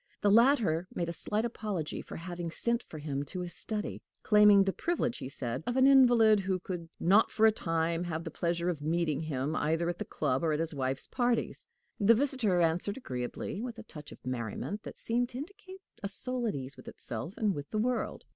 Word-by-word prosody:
The 205 - +4
latter 220 - +4
made 170 -1 -1
a - - -3
slight 210 +6 -1
apology 210 -9 -3
for - - -9
having 175 0 -5
sent 235 +8 -1
for 160 - -11
him 145 -2 -3
to 180 +6 -5
his 175 -1 -6
study 215 +2 -4 0.2
claiming 210 -2 +7
the 195 0 0
privilege, 325 -8 -1
he 130 - -5
said, 125 -3 -4
of 245 - 0
an 260 - +6
invalid, 240 -6 +6
who 190 -1 0
could 175 -2 -6
not 200 +6 +5
for 220 - +3
a 220 - +7
time 165 -3 -1
have 165 -1 -3
the 165 - -6
pleasure 170 +2 -1
of 170 -5 -1
meeting 155 -1 0
him 150 -1 -2
either 165 +3 +1
at 175 - -4
the - - -1
club 130 +4 -1
or 160 -2 +2
at 150 - -1
his 165 0 -1
wife's 135 -1 -2
parties. 240 -2 -1 0.3
The 220 +2 +6
visitor 240 -8 +1
answered 170 +6 +1
agreeably, 125 - -4
with 240 -1 -5
a 225 - -8
touch 150 -8 -10
of - - -14
merriment 125 - -3
that - - -9
seemed 240 +1 0
to 245 - -6
indicate 380 +5 -9 0.2
a 200 - -2
soul 245 +4 0
at 210 - -1
ease 135 0 -5
with - - -14
itself 120 - -6
and 210 -3 +1
with 145 -3 -6
the 215 - -3
world. 245 +3 -1
185 Hz, 215 wpm, -31 LUFS, 160-230 Hz, 0.3 s, claiming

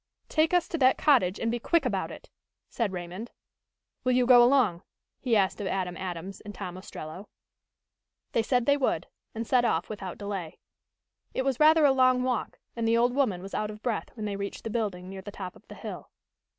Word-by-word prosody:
"Take 315 +1 +2
us 355 -2 +3
to 335 - -2
that 260 -1 +5
cottage 230 -11 +3
and 230 - 0
be 240 - -1
quick 330 +5 +2
about 195 -6 -1
it," - - -11 0.4
said 230 -5 -1
Raymond. 180 +5 -6 0.7
"Will 255 - +2
you 250 0 +3
go 245 -1 +8
along?" 240 -9 +4 0.4
he 245 -3 +1
asked 195 0 +2
of 200 - -2
Adam 180 -1 -2
Adams 185 +1 -6
and 205 -1 -9
Tom 180 -3 -6
Ostrello. 185 0 -9 1.0
They 230 - +2
said 245 +1 +1
they 285 0 +4
would, 270 - 0 0.3
and 225 +1 -3
set 250 +1 +3
off 175 -8 0
without 195 -4 -6
delay. 195 -5 -5 0.8
It 260 - 0
was 270 -3 0
rather 310 0 +6
a 280 - +6
long 255 -1 +4
walk 250 -3 -2 0.2
and 230 -1 -1
the 230 +1 +4
old 245 +1 +3
woman 225 -10 +1
was 195 - -9
out 215 - -1
of 215 0 -10
breath 235 -4 -2
when 215 -2 -5
they 205 -1 -2
reached 200 0 -5
the 225 - -4
building 200 -5 -2
near 190 0 -7
the 190 - -8
top 185 -2 -7
of - - -20
the - - -10
hill. - - -8
225 Hz, 210 wpm, -28 LUFS, 190-255 Hz, 1.0 s, go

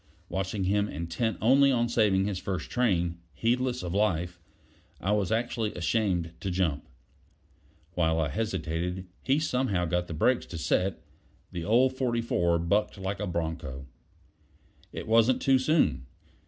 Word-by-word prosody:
Watching 95 +1 -2
him 100 +2 +1
intent 85 +8 -2
only 135 +4 +5
on 120 -2 +2
saving 105 -5 +2
his 100 -3 -2
first 95 -1 -4
train 90 -9 +1
heedless 125 +2 0
of 85 - -3
his 100 - 0
life 90 -4 0 0.6
I 95 - -1
was 105 -2 +1
actually 115 -1 -1
ashamed 90 -2 0
to 95 - -3
jump. 90 -6 -1 1.1
While 80 -2 +1
I 80 -3 0
hesitated 90 -2 -2 0.2
he 135 +2 +2
somehow 125 - 0
got 90 +1 -1
the 80 - -5
brakes 125 +10 +2
to 85 - -6
set; 95 +4 0 0.5
the 85 - -4
old 125 +4 +4
44 115 -9 +1
bucked 100 +6 0
like 95 +1 -4
a 105 - -2
bronco. 80 -6 -4 1.1
It - - -7
wasn't 115 +3 +4
too 135 -1 +4
soon. 130 - +2
100 Hz, 145 wpm, -28 LUFS, 85-115 Hz, 1.1 s, only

